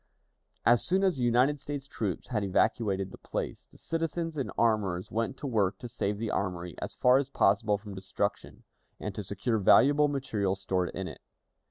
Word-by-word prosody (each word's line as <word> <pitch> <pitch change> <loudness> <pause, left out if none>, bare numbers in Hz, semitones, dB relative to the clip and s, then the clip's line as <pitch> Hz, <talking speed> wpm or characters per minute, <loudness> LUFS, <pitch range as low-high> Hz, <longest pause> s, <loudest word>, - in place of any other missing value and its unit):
As 120 0 +5
soon 190 +2 +2
as 185 -6 +2
the 125 - -1
United 125 +5 +3
States 140 0 -5
troops 110 -8 -4
had 110 -5 -1
evacuated 100 -1 +1
the - - -11
place, - - -5
the - - -19
citizens 165 0 -2
and 135 -3 -3
armorers 100 -6 +1
went 115 +4 -1
to 145 - -7
work 105 -7 +1
to 120 - -7
save 105 -4 -2
the 110 +1 -3
armory 90 -3 -2
as - - -5
far 125 +1 +5
as 140 -1 -3
possible 105 -3 +2
from 105 0 -10
destruction, 100 +1 -3 0.4
and 105 - -4
to 105 - -4
secure 105 +4 -1
valuable 145 +9 +5
material 110 -9 -1
stored 95 -2 -1
in 95 0 -3
it. 80 - -9
110 Hz, 185 wpm, -29 LUFS, 100-135 Hz, 0.4 s, As